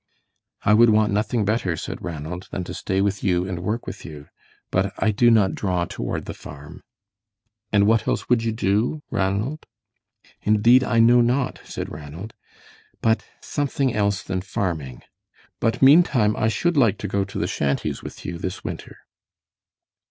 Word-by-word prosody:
"I 105 - +4
would 115 +2 +6
want 105 -1 +3
nothing 105 +1 0
better," 100 -5 0
said - - -6
Ranald, 85 +2 -6
"than 95 - -4
to - - -7
stay 95 +1 -1
with 100 -1 -1
you 90 -2 +1
and 90 -3 -4
work 105 +7 -3
with 100 - -7
you, 75 -3 -10 0.4
but 95 +2 +1
I 110 - +2
do 120 +3 +4
not 105 -5 +4
draw 90 -3 -1
toward - - -4
the - - -5
farm." 75 0 -11 0.9
"And 100 -1 +4
what 110 +1 +2
else - - -1
would 120 -2 +2
you 115 - 0
do, 110 +8 0
Ranald?" 100 +10 -1 0.7
"Indeed, 115 +5 +5
I 115 - 0
know 120 +2 +6
not," 125 +3 0
said - - -6
Ranald, 80 +9 -8 0.7
"but 110 0 +2 0.2
something 140 -3 -1
else 100 -2 0
than 95 -1 -3
farming. 85 - -4 0.6
But 115 +3 0
meantime 135 -7 +5
I 110 - +1
should 170 +8 0
like 110 -7 +4
to 105 - -4
go 100 0 0
to 95 - -7
the - - 0
shanties 70 -1 -1
with - - -10
you 85 -2 -5
this 90 - -5
winter." - - -7
105 Hz, 165 wpm, -23 LUFS, 90-115 Hz, 0.9 s, would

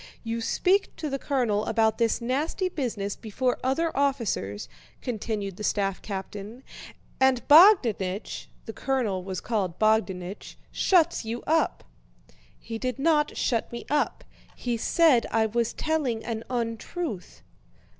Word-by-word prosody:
"You 230 0 -3
speak 375 - +1
to 305 -3 -4
the 275 - -2
colonel 240 -8 0
about 220 -1 +2
this 230 0 +1
nasty 295 - -1
business 225 - -3
before 245 +3 -2
other 320 +6 0
officers," 230 - -1 0.3
continued 210 -5 -4
the 210 - -6
staff 195 -2 0
captain, 205 +4 -7 0.6
"and 265 -2 +3
Bogdánich" 245 - +5 0.2
(the 225 - -6
colonel 230 -10 -1
was 185 -1 -4
called 195 -7 -2
Bogdánich) 205 -4 0 0.2
"shuts 340 -6 +3
you 230 +2 -5
up." 320 0 +1 0.7
"He 225 0 -7
did 255 0 -2
not 300 +1 +2
shut 230 -3 0
me 235 - -7
up, 295 0 0 0.3
he 245 -1 -2
said 275 +1 +3
I 225 -1 +2
was 230 +1 0
telling 285 -8 -1
an 225 -1 -4
untruth." 235 - -4
235 Hz, 130 wpm, -26 LUFS, 210-275 Hz, 0.7 s, Bogdánich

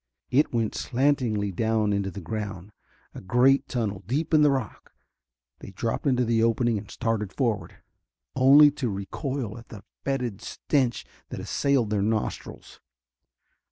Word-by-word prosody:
It 140 +4 +3
went 115 -3 -1
slantingly 120 -6 0
down 110 +2 0
into 100 -1 -1
the 100 +1 -8
ground, 100 0 -6 0.4
a - - -9
great 125 +8 +3
tunnel, 105 -6 -3
deep 150 +7 -2
in 155 - +6
the 150 - +5
rock. 130 -7 -4 0.7
They - - -10
dropped 115 +8 -3
into 125 -2 +2
the 115 -1 +1
opening 115 -1 +1
and - - -12
started 115 -4 -2
forward, 115 -3 -2 0.6
only 140 +3 +7
to 135 -4 -3
recoil 110 +4 -4
at 115 - -16
the 105 -3 -11 0.2
fetid 125 -7 -2
stench 130 -5 -1 0.2
that - - -6
assailed 135 -6 0
their 105 -2 +1
nostrils. 110 +1 -3
115 Hz, 145 wpm, -26 LUFS, 105-135 Hz, 0.7 s, only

